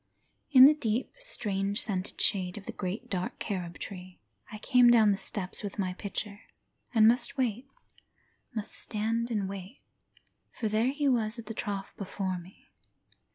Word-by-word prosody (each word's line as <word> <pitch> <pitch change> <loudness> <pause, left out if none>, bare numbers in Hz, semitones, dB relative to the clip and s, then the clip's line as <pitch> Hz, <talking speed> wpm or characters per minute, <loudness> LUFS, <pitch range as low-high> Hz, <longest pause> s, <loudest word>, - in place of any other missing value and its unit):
In 260 -2 +10
the 295 - +8
deep, 235 -5 -2
strange 205 - 0
scented 190 -3 -3
shade 185 -2 +1
of 200 - -9
the - - -5
great 195 +7 -5
dark 185 -5 -3
carob 175 -4 -4
tree 185 -1 -9 0.3
I 215 - -6
came 250 +2 +5
down 225 -3 +6
the - - +2
steps 190 -3 +2
with 205 -2 -6
my 185 -3 -1
pitcher 200 +2 -6 0.5
And 220 -4 +5
must 245 +4 +2
wait, 250 0 -1 0.9
must 215 -1 -3
stand 230 +2 -2
and 210 -4 -1
wait, 195 +5 -8 0.8
for 225 - 0
there 220 +4 +1
he 285 +1 -1
was 230 -3 +1
at 230 - -8
the 225 - -6
trough 200 -2 -4
before 190 -2 -3
me. 180 +3 -16
210 Hz, 160 wpm, -29 LUFS, 195-235 Hz, 0.9 s, In